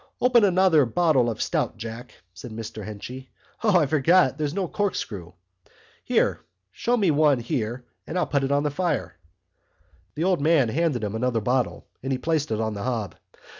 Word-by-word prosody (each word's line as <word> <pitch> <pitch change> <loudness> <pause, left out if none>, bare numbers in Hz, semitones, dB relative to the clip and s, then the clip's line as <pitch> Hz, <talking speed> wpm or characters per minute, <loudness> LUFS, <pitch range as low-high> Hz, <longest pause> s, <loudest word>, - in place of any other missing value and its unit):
"Open 245 -2 +4
another 185 -5 +4
bottle 140 -3 +2
of 110 -1 -5
stout, - - -1
Jack," 115 +1 -8 0.2
said 125 +6 -9
Mr 110 -1 -7
Henchy. 125 +6 -8 0.3
"O, 210 -5 +4
I 160 - +3
forgot 155 0 +3
there's 150 -1 -2
no 185 +2 -2
corkscrew! 105 - -3 0.7
Here, - - +1 0.3
show 240 - 0
me 195 -7 +3
one 150 -2 +4
here 120 +1 -3 0.2
and 180 - -3
I'll 180 - +2
put 140 -2 0
it 135 - 0
at 140 +1 +2
the 150 - 0
fire." 175 +4 -1 1.0
The 155 - -2
old 185 -4 +2
man 150 -5 +3
handed 145 -3 0
him 105 -1 -2
another 115 +1 0
bottle 125 +3 -1 0.2
and 135 - -3
he 130 - +1
placed 155 +2 -1
it 110 -1 -1
on 110 -1 -1
the 100 - -6
hob. 115 -7 -2
135 Hz, 180 wpm, -25 LUFS, 115-165 Hz, 1.0 s, Open